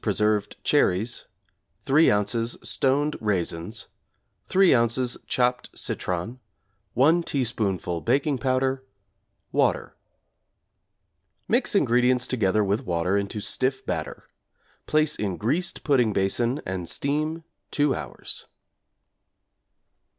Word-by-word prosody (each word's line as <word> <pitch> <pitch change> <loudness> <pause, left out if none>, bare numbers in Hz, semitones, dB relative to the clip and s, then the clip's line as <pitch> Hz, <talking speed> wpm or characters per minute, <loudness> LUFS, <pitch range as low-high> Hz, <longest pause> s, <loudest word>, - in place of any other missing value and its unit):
preserved 105 -1 0
cherries, 105 +7 +1 0.6
3 150 +4 +5
ozs. 115 +3 +1
stoned 145 +3 +1
raisins, 100 0 -2 0.6
3 190 -1 +4
ozs. 120 +1 +2
chopped 125 0 0
citron, 90 +8 -3 0.6
1 155 +8 +4
teaspoonful 105 - -2
baking 135 +3 +1
powder, 130 0 0 0.7
water. - - 0 1.5
Mix - - +1
ingredients 125 +1 +3
together 110 -4 +1
with 100 +6 0
water 90 -1 0
into 100 +1 -2
stiff 130 +5 0
batter; - - -4 0.6
place 155 0 +2
in 100 -4 -2
greased 160 - -1
pudding 125 -7 +2
basin 115 +7 0
and 90 -3 -4
steam 155 - -2 0.3
2 145 -2 +1
hours. - - -6
120 Hz, 95 wpm, -25 LUFS, 100-135 Hz, 1.5 s, 3